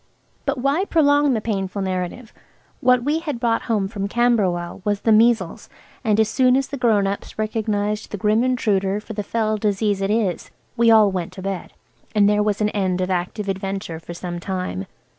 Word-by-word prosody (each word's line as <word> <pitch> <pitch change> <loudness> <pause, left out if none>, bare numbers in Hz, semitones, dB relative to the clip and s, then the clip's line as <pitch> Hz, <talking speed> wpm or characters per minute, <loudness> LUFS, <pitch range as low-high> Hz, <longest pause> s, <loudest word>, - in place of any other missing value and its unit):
But 280 0 0
why 275 +8 +1
prolong 290 -5 +3
the 220 - -1
painful 195 -2 -2
narrative? 185 +5 -4 0.5
What 250 -1 +3
we 295 +4 +1
had 295 -7 -4
brought 230 -1 +1
home 210 -4 +1
from 200 -1 -4
Camberwell 200 -7 +1
was 205 -1 -1
the 225 - +2
measles, 225 +2 +3 0.3
and 215 -2 +2
as 220 - +4
soon 255 +3 +3
as 270 - -1
the 285 - -4
grown 220 -5 +3
ups 200 +1 -4
recognised 210 -1 -1
the 205 - -5
Grim 215 +4 +2
Intruder 205 -6 +1
for 220 +1 -9
the 210 - -3
fell 215 +1 -1
disease 205 -1 0
it 195 - 0
is 210 -5 0 0.3
we 235 -1 +4
all 215 -3 +6
went 180 -3 -4
to 190 - -9
bed, 195 -2 -4 0.4
and 205 -1 +5
there 210 0 +3
was 210 0 0
an 210 - +2
end 190 -3 -1
of 185 0 -1
active 185 +3 -2
adventure 195 -3 -3
for 170 +1 -9
some 175 0 -5
time. 180 - -4
210 Hz, 195 wpm, -21 LUFS, 195-230 Hz, 0.5 s, all